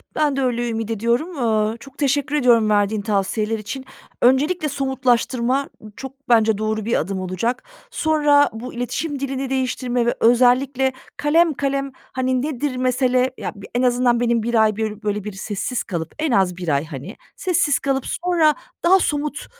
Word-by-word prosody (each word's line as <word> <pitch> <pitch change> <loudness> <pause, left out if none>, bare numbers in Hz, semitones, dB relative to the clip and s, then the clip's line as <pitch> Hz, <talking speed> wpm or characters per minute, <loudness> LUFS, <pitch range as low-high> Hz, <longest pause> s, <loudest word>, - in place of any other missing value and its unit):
Ben 295 -3 +1
de 275 - -1
öyle 240 -2 0
ümit 225 -1 -3
ediyorum. 235 - -1
Aaa, 220 -2 +1
çok 275 +2 -14
teşekkür 285 0 0
ediyorum 235 -6 +4
verdiğin 205 0 +2
tavsiyeler 210 +2 -1
için. 260 +5 -6 0.4
Öncelikle 300 +6 +3
somutlaştırma, 260 -1 0 0.2
ı 215 - -11
çok 270 0 -10
bence 220 -3 +4
doğru 215 0 -2
bir 235 - +1
adım 190 +3 -3
olacak. 185 +7 -2 0.3
Sonra 295 -8 +3
bu 235 +3 -7
iletişim 275 +5 -3
dilini 270 -1 -3
değiştirme 250 -2 -1
ve 240 - +1
özellikle 255 +3 +3 0.2
kalem 310 +3 +3
kalem, 275 0 -2 0.2
hani, 255 0 0
nedir 285 -1 -2
mesele, 255 0 +1
ya, - - -4
bir 200 -1 -11
en 245 - +2
azından 245 -1 +2
benim 235 -2 +1
1 230 -1 +3
ay, 215 -1 +1
börü 215 -1 -3
böyle, 210 -1 -2
bir 210 -2 -6
sessiz 210 +5 -3
kalıp 170 -4 -5
en 310 -2 0
az 190 -5 +2
1 180 -2 -6
ay, 145 +1 +1
hani, 150 - -8 0.2
sessiz 345 -6 +1
kalıp 270 -2 -1
sonra 335 -4 +2 0.3
daha 375 +2 +6
somut 295 -2 -2
250 Hz, 170 wpm, -21 LUFS, 220-275 Hz, 0.4 s, daha